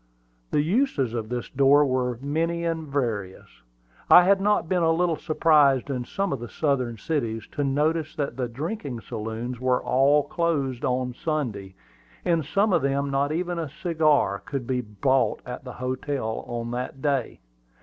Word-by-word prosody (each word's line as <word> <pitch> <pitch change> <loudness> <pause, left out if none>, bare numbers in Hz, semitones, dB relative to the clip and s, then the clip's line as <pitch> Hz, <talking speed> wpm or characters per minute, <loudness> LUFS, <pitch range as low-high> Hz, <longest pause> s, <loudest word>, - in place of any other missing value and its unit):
The 145 - +2
uses 165 - +1
of 110 -2 -3
this 120 -1 -3
door 140 +2 +5
were 125 -2 0
many 165 +4 -1
and 165 -2 -2
various. 115 - -4 0.5
I 180 - +9
had 195 +2 +4
been - - -4
not 210 -5 +1
a 175 -3 +3
little 165 0 +2
surprised 150 -4 +3
in 125 -2 -3
some 195 +2 -2
of 135 - -3
the 120 -1 -7
Southern 130 -6 -1
cities 115 -4 -2
to 145 - -2
notice 155 +3 0
that 140 -5 -2
the 125 -1 -2
drinking 140 - -5
saloons 115 +3 -5
were 130 0 +2
all 140 +3 +3
closed 140 -8 -1
on 125 0 0
Sunday. 120 - -3 0.5
In 170 -2 +2
some 195 +7 +1
of - - +3
them 140 +1 0
not 140 +1 +1
even 175 +1 -2
a 160 -3 -3
cigar 155 - +1
could 125 +5 -5
be 125 0 -1
bought 130 +5 +1
at 125 +2 -7
the 125 - -7
hotel 130 -2 -3
on 120 0 -4
that 125 +2 -4
day. 140 -5 -1
140 Hz, 170 wpm, -25 LUFS, 125-160 Hz, 0.5 s, I